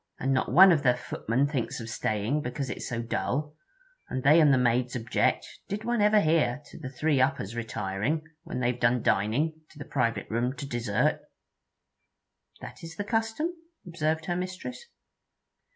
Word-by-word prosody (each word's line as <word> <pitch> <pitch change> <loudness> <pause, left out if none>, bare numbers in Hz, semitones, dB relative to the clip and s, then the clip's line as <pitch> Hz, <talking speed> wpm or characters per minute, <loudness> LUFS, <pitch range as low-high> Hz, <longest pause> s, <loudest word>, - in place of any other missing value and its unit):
And 135 +1 +1
not 130 - 0
one 190 +2 +9
of 160 -4 +3
the 125 -3 +3
footmen 125 +1 -1
thinks 140 -5 -2
of 115 - -7
staying, 110 +5 -1
because 125 0 -4
it - - -6
's - - -5
so 120 -2 -3
dull; 145 +6 -2 0.5
and 130 - -3
they 155 +4 +6
and 150 -2 +6
the 135 - +5
maids 125 +1 +1
object 120 -1 0 0.2
did 205 +2 -4
one 235 -1 0
ever 210 +1 +5
hear? 150 -6 +1
to - - -11
the 130 - -6
three 140 +1 +1
uppers 130 -5 0
retiring, 115 +5 -2 0.2
when 125 - -5
they 120 0 +2
've 125 - -9
done 120 0 +2
dining, 145 +11 +1
to - - -18
the 145 - -7
private 120 -4 -1
room 120 +3 -1
to 140 - -6
dessert.' 120 -6 0 1.4
'That - - -10
is 165 0 -8
the 205 - -3
custom?' 225 +10 -1 0.3
observed 160 -2 -1
her 175 - -1
mistress. 185 - -5
135 Hz, 180 wpm, -28 LUFS, 120-160 Hz, 1.4 s, one